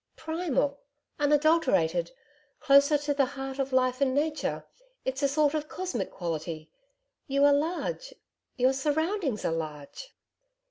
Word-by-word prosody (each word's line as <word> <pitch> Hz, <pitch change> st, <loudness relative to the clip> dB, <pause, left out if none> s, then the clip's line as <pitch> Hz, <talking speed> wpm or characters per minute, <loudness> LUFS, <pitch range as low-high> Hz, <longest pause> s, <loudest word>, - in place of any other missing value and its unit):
'Primal, 310 Hz, -4 st, -1 dB, 0.4 s
unadulterated 290 Hz, -, +2 dB, 0.5 s
closer 280 Hz, +2 st, +5 dB
to 290 Hz, 0 st, -1 dB
the 275 Hz, -2 st, +2 dB
heart 270 Hz, 0 st, -5 dB
of 270 Hz, 0 st, -1 dB
life 255 Hz, 0 st, +1 dB
and 265 Hz, -1 st, +2 dB
nature. 305 Hz, +1 st, -1 dB, 0.4 s
It's 265 Hz, +2 st, -2 dB
a 280 Hz, -, +3 dB
sort 290 Hz, +1 st, +2 dB
of 305 Hz, -1 st, -3 dB
cosmic 355 Hz, -, -3 dB
quality. 160 Hz, -2 st, -5 dB, 0.6 s
You 280 Hz, 0 st, +3 dB
are 285 Hz, -, +6 dB
large 355 Hz, +12 st, -2 dB, 0.5 s
your 255 Hz, +1 st, +3 dB
surroundings 300 Hz, -, -1 dB
are -, -, +1 dB
large.' 155 Hz, -, -7 dB
280 Hz, 130 wpm, -28 LUFS, 255-305 Hz, 0.6 s, are